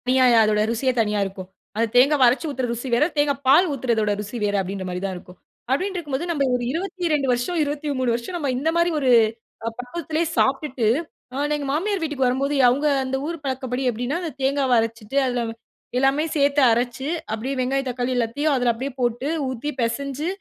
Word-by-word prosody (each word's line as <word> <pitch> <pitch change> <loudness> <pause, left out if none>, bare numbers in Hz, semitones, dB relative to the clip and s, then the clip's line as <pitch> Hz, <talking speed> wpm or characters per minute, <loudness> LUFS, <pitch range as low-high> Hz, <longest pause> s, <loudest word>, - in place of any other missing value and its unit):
தணியா, 255 0 +4 0.2
அதோட 210 0 +2
ருசியே 235 +3 +1
தனியா 210 -1 0
இருக்கும். 190 -1 -7 0.3
அந்த 230 +2 +1
தேங்காவ 275 +3 +5
அரைச்சு 255 +7 +1
ஊத்துற 255 -2 -2
ருசி 240 +3 -5
வேற, 240 +6 +4
தேங்காய் 285 -1 +1
பால் 305 +8 +6
ஊத்துறதோட 235 -5 0
ருசி 210 +4 -6
வேற 205 0 +1
அப்டின்ற 190 0 -5
மாரி 180 0 -4
தான் 190 -1 -3
இருக்கும். 180 0 -14 0.3
அப்டின்ட்ருக்கும்போது 340 -2 -1
நம்ம 290 -4 0
ஒரு 245 - -2
22 335 -4 -1
வருஷம், 245 +9 -1
23 285 -4 -1
வருஷம் 240 +10 -4
நம்ம 290 -5 -2
இந்த 295 +5 0
மாரி 340 +1 +3
ஒரு 265 -3 +1 0.6
அ - - +2
பக்கத்லயே 315 +5 -2
சாப்ட்டுட்டு, 270 -3 +1 0.5
அ - - -7
நான் 290 +2 0
எங்க 285 -1 -4
மாமியார் 390 +5 -1
வீட்டுக்கு 290 -5 0
வரம்போது, 275 +3 0
அவுங்க 280 +5 +1 0.2
அந்த 260 0 -2
ஊரு 335 0 -3
பழக்கபடி 260 -1 -3
எப்டின்னா, 245 +6 -2
அந்த 335 -3 -4
தேங்காவ 270 -1 +1
அரைச்சுட்டு 225 +2 -3
அதுல 245 -1 -1 0.5
எல்லாமே 270 +4 +2
சேத்து 285 0 +3
அரைச்சு, 245 +3 -1 0.3
அப்டியே 250 +5 -3
வெங்காயம் 270 +1 0
தக்காளி 245 0 -2
எல்லாத்தையும் 255 +6 0
அதுல 245 -2 +2
அப்டியே 260 +5 -4
போட்டு 240 +2 0 0.2
ஊத்தி 260 +3 -4
பெசஞ்சு 275 +6 -2
265 Hz, 180 wpm, -23 LUFS, 240-290 Hz, 0.6 s, பால்